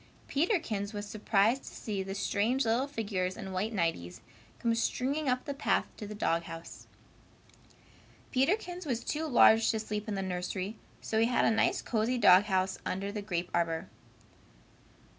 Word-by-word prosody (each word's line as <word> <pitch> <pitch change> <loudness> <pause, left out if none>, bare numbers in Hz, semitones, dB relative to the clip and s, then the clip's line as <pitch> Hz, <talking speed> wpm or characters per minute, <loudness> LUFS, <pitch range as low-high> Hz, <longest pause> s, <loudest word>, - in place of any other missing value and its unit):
Peterkins 275 - 0
was 205 0 -5
surprised 215 +4 +2
to - - -9
see 205 -3 -3
the 195 0 -5
strange 225 +6 +1
little 235 +5 +1
figures 200 -8 -2
in 195 -4 -6
white 190 +4 -1
nighties 165 - -2 0.4
come 230 - +1
stringing 265 +5 0
up 250 0 0
the 285 - -3
path 275 - +1
to 210 - -7
the 210 - -7
dog 165 -5 +1
house. 165 0 -9 1.4
Peterkins 355 +5 0
was 240 -4 -1
too 315 +1 -2
large 225 -4 +6
to 220 - +1
sleep 210 0 -4
in 210 - -2
the 195 - -2
nursery, 185 +2 -3 0.3
so 220 - -1
he 225 - +4
had 245 - +2
a - - +4
nice 220 - +1
cozy 235 +2 0
dog 195 -3 +7
house 190 -2 0
under 195 +2 -3
the 210 0 -4
grape 180 -3 -3
arbor. 165 +1 0
215 Hz, 165 wpm, -31 LUFS, 190-245 Hz, 1.4 s, dog